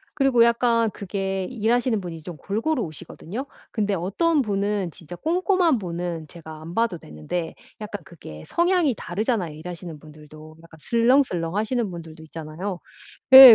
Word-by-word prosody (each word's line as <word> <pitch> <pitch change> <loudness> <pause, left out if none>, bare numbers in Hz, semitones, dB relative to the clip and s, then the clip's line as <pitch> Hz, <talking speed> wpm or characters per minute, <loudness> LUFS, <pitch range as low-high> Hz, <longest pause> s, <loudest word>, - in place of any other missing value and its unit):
그리고 270 -5 +5
약간 235 -1 +3
그게 195 -1 -2
일하시는 235 -1 +1
분이 165 -3 -7
좀 175 -3 -7
골고루 230 +7 -1
오시거든요. 175 - -6 0.3
근데 210 -3 0
어떤 270 - +2
분은 200 -4 0
진짜 170 +2 -10
꼼꼼한 350 - +2
분은 170 -3 -4
제가 160 -2 -10
안 165 +2 -8
봐도 225 -6 +1
되는데 155 - -5 0.2
약간 205 -4 -6
그게 80 - -11
성향이 345 - +3
다르잖아요 190 - -1
일하시는 170 0 -7
분들도. 155 +1 -13
약간 165 -1 -15
슬렁슬렁하시는 230 - +2
분들도 165 -2 -9
있잖아요. 165 +4 -5 0.6
예. 260 -3 +14
195 Hz, 350 characters per minute, -24 LUFS, 165-235 Hz, 0.6 s, 예